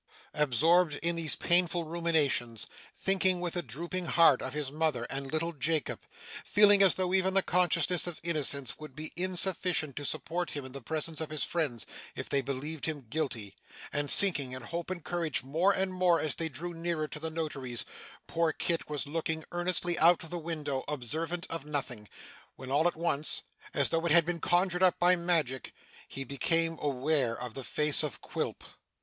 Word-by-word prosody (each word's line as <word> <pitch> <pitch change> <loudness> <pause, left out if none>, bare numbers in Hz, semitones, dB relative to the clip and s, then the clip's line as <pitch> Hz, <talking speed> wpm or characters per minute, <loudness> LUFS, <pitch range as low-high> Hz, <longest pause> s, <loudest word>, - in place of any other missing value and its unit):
Absorbed 150 +4 +3
in 170 0 0
these 165 -2 +2
painful 175 0 +2
ruminations, 155 -8 0 0.3
thinking 190 -1 +1
with 175 0 -3
a 175 - 0
drooping 175 +2 -5
heart 165 -6 +5
of 130 +2 -5
his 145 -3 -2
mother 150 -5 0
and 135 0 -4
little 165 +2 -1
Jacob, 155 +2 -1 0.4
feeling 205 -1 +5
as 195 -2 +5
though 185 -1 -1
even 190 0 +2
the 195 - +4
consciousness 180 0 +2
of 175 - -5
innocence 145 -5 +1
would 155 -3 -10
be 155 +1 -6
insufficient 180 -4 +1
to 145 - -5
support 175 +5 -3
him 145 -2 -5
in 130 - -9
the 140 +1 -8
presence 160 +4 -1
of 160 - -4
his 155 -1 -2
friends 145 - -1 0.3
if - - -6
they 140 - +1
believed 140 +4 -3
him 145 -5 -4
guilty, 120 -10 -3 0.4
and 145 0 -1
sinking 145 -10 +4
in 130 -1 -6
hope 170 +7 -5
and 180 -3 -5
courage 170 -7 -2
more 160 +9 +2
and 190 -1 0
more 180 -2 +3
as 155 -3 +2
they 165 +5 -3
drew 170 +5 -6
nearer 165 -2 -2
to 150 - -6
the 160 +1 -2
notary's, 135 -8 -2 0.4
poor 165 -1 0
Kit 165 0 -1
was 150 -1 -2
looking 160 +1 -3
earnestly 175 0 +1
out 170 +2 +5
of 160 - -11
the 175 - -3
window, 150 -5 -3
observant 160 +6 -3
of 165 -3 -3
nothing, 135 -8 -4 0.5
when 130 0 -9
all 150 +5 +3
at 175 - -1
once, 155 -2 +2 0.3
as - - +2
though 165 0 0
it - - 0
had 170 0 +7
been 175 0 -2
conjured 180 +2 +1
up 185 -1 +4
by 180 +1 +5
magic, 165 -7 -1 0.3
he 135 - -6
became 165 +5 +1
aware 135 -3 +1
of 125 -2 -6
the 135 - -6
face 150 +3 +3
of 150 -7 -4
Quilp. - - -4
160 Hz, 185 wpm, -30 LUFS, 140-175 Hz, 0.5 s, had